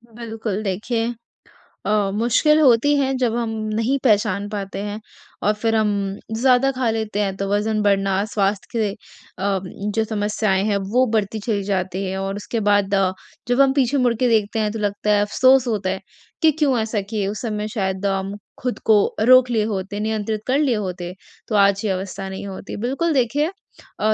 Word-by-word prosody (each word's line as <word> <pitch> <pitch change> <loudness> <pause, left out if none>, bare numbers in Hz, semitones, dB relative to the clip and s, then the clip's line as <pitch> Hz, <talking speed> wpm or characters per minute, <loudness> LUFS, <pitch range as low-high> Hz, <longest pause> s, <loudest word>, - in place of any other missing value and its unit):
बिल्कुल, 220 -3 -4
देखिए 225 +4 -1 0.7
अ, 205 -2 +1
मुश्किल 250 +7 +3
होती 290 +1 +5
है 270 -1 +1
जब 240 -3 0
हम 235 -1 -1 0.3
नहीं 230 +5 +1
पहचान 205 -3 +2
पाते 195 -2 -5
हैं 205 +1 -4 0.4
और 210 - +3
फिर 225 +1 0
हम 215 -1 +2 0.5
ज़्यादा 255 +3 +3
खा 255 -3 -1
लेते 220 -2 -2
हैं, 195 -2 -1
तो 195 - -2
वज़न 210 +1 +1
बढ़ना 195 -1 +2
स्वास्थ्य 200 -1 0
के 215 -2 +1
अ, 195 -1 -5 0.4
जो 220 - +2
समस्याएँ 205 -2 0
हैं 205 -2 +1
वो 255 +2 +4
बढ़ती 215 +1 -1
चली 205 -2 -1
जाती 190 -1 -2
है। 190 +1 -3
और 195 0 -3
उसके 215 +3 -3
बाद 200 -1 +2
अ, 190 -1 +2 0.4
जब 245 +3 +3
हम 270 -1 +4
पीछे 275 0 +2
मुड़ 250 -3 +3
के 245 +2 +1
देखते 220 -1 +1
हैं 210 -1 0
तो 225 - -5
लगता 205 0 -1
है 205 - +3
अफ़सोस 255 +4 +4
होता 205 -4 -1
है। 190 0 -3 0.4
कि 320 - +7
क्यों 275 -5 +3
ऐसा 220 -1 -1
किए 210 -3 -1
उस 205 +1 -4
समय 210 -3 -3
शायद 190 -2 -2
हम 195 0 -1 0.3
खुद 250 -1 -2
को 220 - +5 0.3
रोक 255 -1 +7
लिए 225 -3 +1
होते, 200 -1 -3
नियंत्रित 215 0 -2
कर 260 +2 +2
लिए 270 -6 +2
होते, 180 -3 -4 0.3
तो 215 - -2
आज 200 0 +4
ये 205 - +1
अवस्था 190 +1 -4
नहीं 190 +1 -6
होती। 195 0 -7
बिल्कुल 275 +9 -1
देखिए 275 +3 +1 0.5
अ, 215 0 +3
215 Hz, 190 wpm, -21 LUFS, 200-240 Hz, 0.7 s, कि